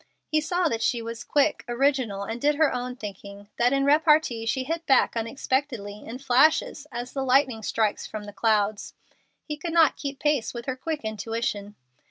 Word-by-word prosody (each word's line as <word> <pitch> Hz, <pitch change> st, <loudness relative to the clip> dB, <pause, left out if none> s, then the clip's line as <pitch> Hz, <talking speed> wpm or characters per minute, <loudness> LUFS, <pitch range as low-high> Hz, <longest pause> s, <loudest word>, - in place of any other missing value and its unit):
He 310 Hz, 0 st, +1 dB
saw 355 Hz, +3 st, 0 dB
that 230 Hz, -6 st, -2 dB
she 240 Hz, -, +1 dB
was 230 Hz, 0 st, -6 dB
quick, 295 Hz, +1 st, +1 dB
original, 240 Hz, -5 st, 0 dB
and 225 Hz, +3 st, -5 dB
did 295 Hz, +1 st, +3 dB
her 310 Hz, -1 st, +3 dB
own 250 Hz, 0 st, -4 dB
thinking, 200 Hz, -2 st, -9 dB
that 240 Hz, +1 st, +3 dB
in 275 Hz, 0 st, +2 dB
repartee 300 Hz, -6 st, +3 dB
she 260 Hz, +3 st, 0 dB
hit 325 Hz, +5 st, -3 dB
back 265 Hz, -3 st, +4 dB
unexpectedly, 230 Hz, -3 st, -2 dB
in 230 Hz, +3 st, -7 dB
flashes, 280 Hz, +3 st, +2 dB
as 240 Hz, +1 st, -6 dB
the 270 Hz, -, -2 dB
lightning 260 Hz, -3 st, +2 dB
strikes 215 Hz, 0 st, -1 dB
from 215 Hz, -1 st, -6 dB
the 205 Hz, 0 st, -9 dB
clouds. 210 Hz, -1 st, 0 dB, 0.5 s
He 300 Hz, -1 st, -5 dB
could 330 Hz, +1 st, -5 dB
not 325 Hz, -3 st, +4 dB
keep 280 Hz, -1 st, -5 dB
pace 295 Hz, -6 st, 0 dB
with 235 Hz, 0 st, -6 dB
her 260 Hz, -, -2 dB
quick 310 Hz, +3 st, -4 dB
intuition. 215 Hz, -1 st, -3 dB
250 Hz, 185 wpm, -26 LUFS, 225-290 Hz, 0.5 s, back